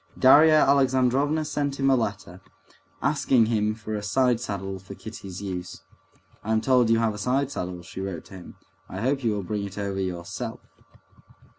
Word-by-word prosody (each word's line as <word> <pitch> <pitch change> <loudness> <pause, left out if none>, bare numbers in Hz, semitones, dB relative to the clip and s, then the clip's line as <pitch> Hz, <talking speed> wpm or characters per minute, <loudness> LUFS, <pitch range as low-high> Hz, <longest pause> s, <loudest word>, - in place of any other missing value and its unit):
Darya 155 +4 +7
Alexandrovna 135 +2 +2
sent 145 -2 -2
him 135 - +2
a - - +5
letter, 100 -6 -4 0.6
asking 135 -5 +3
him 110 -1 0
for 110 0 -7
a 105 - -2
side 125 +3 +2
saddle 95 -4 -5
for 95 - -11
Kitty's 100 -4 -9
use. 90 -2 -6 0.6
"I'm 110 +1 +1
told 125 0 +3
you 115 - +4
have 115 -1 +1
a 105 - -8
side 130 +5 0
saddle," 90 -5 -5
she 95 - -8
wrote 95 -4 -5
to - - -15
him; 95 -2 -11 0.3
"I 95 - -6
hope 135 +3 0
you 115 -2 +1
will 100 -1 -3
bring 105 +2 -3
it 100 -1 -7
over 100 -1 -3
yourself." 90 -2 -5
110 Hz, 175 wpm, -25 LUFS, 95-130 Hz, 0.6 s, Darya